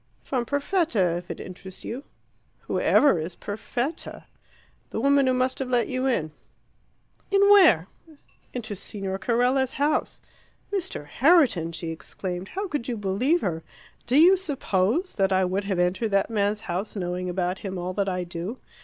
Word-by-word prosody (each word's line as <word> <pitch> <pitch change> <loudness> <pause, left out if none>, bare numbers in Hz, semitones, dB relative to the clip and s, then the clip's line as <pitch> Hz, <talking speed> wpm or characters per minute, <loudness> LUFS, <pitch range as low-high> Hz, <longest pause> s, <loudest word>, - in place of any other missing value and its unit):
"From 245 -3 -2
Perfetta, 285 - +1
if 175 0 -9
it - - -5
interests 185 0 -9
you." 255 +5 -5 0.6
"Who - - -2
ever 280 - +4
is 170 +3 -5
Perfetta?" 240 +8 -4 0.7
"The - - -3
woman 280 +2 +4
who 255 - +3
must 255 +1 0
have 265 -2 -3
let 245 -2 +2
you 255 +1 -1
in." 160 -12 0 1.0
"In 395 0 +3
where?" 235 - +7 0.7
"Into 220 -4 -5
Signor 195 0 -4
Carella's 250 +4 +1
house." 290 +2 0 0.5
"Mr. 375 - -3
Herriton!" 250 - +3
she 165 0 -5
exclaimed. 180 +2 -5
"How 395 - -4
could 295 -8 -3
you 240 -3 -2
believe 215 - +1
her? 165 -3 -2 0.5
Do 250 +3 +3
you 360 +5 +7
suppose 285 - 0
that 195 -1 +2
I 190 0 +3
would 190 +2 -1
have 195 -2 -1
entered 180 +5 +1
that 200 +2 +1
man's 210 0 0
house, 190 +4 -4
knowing 180 -1 -3
about 180 +1 -1
him 190 -2 -5
all 180 +1 -3
that 200 0 0
I 180 -1 -2
do? 175 +7 -5
210 Hz, 160 wpm, -25 LUFS, 185-270 Hz, 1.0 s, where